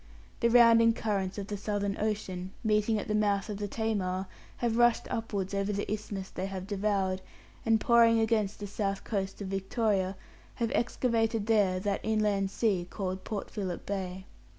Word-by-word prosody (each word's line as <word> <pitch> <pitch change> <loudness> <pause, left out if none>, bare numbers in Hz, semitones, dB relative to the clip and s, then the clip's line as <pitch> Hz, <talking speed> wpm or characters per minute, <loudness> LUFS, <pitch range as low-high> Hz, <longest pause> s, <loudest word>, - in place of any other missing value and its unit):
The 235 - +3
rounding 230 -1 +7
currents 200 -4 -2
of 200 - -3
the 205 0 -4
Southern 200 -1 -1
Ocean, 190 -3 -2
meeting 215 0 +2
at 205 - -4
the 215 - -1
mouth 205 -1 +1
of 205 - -3
the 205 0 -3
Tamar, 195 -4 -1 0.3
have 235 -2 0
rushed 240 -1 +4
upwards 200 -4 -2
over 200 +1 0
the 205 0 -2
isthmus 205 -2 -4
they 185 +1 -3
have 190 -1 -5
devoured, 195 -2 0 0.5
and 225 -1 +4
pouring 230 0 +5
against 220 -3 +1
the 205 - -4
south 200 -1 -2
coast 195 -1 -3
of 190 - -5
Victoria, 195 0 0 0.4
have 230 -2 -1
excavated 225 -3 +1
there 205 -5 +3
that 200 +1 -1
inland 210 -3 +1
sea 195 -4 0
called 190 -2 -4
Port 210 -3 -5
Philip 190 -5 -4
Bay. 190 -1 -4
205 Hz, 170 wpm, -30 LUFS, 195-220 Hz, 0.5 s, rounding